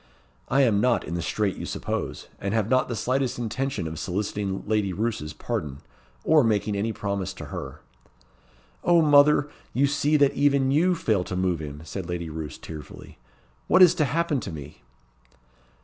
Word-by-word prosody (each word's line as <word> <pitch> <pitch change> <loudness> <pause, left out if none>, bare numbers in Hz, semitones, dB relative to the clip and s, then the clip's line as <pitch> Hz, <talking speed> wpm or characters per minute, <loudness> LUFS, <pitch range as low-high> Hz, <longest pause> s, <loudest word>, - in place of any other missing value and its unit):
"I 135 +2 +3
am 105 -5 +3
not 125 0 +2
in 80 - -6
the 85 - -2
strait 100 +3 -1
you - - -5
suppose; - - -4
and 100 +2 -2
have 110 -2 +1
not 130 0 +3
the 120 - -3
slightest 130 +3 -1
intention 120 -3 -2
of 80 0 -6
soliciting 100 +1 -3
Lady 105 -2 0
Roos's 105 -6 -2
pardon, 70 -3 -4 0.5
or 155 -3 +5
making 105 -2 +1
any 105 +3 -1
promise 100 -3 -3
to - - -8
her." - - -7 1.0
"O 170 -2 +5
mother! 145 0 +5 0.3
you 135 +3 +4
see 145 +2 +2
that 140 -2 +4
even 140 -2 +2
you 175 +6 +3
fail 110 - +1
to 95 - -5
move 90 -2 0
him," 75 0 -7
said 90 0 -6
Lady 85 -2 -4
Roos, 75 -1 -6
tearfully. 75 -6 -10 0.5
"What 185 - +7
is 175 -2 +7
to 155 -4 +1
happen 160 -1 0
to 100 - -6
me?" 75 -2 -9
110 Hz, 175 wpm, -25 LUFS, 90-140 Hz, 1.0 s, What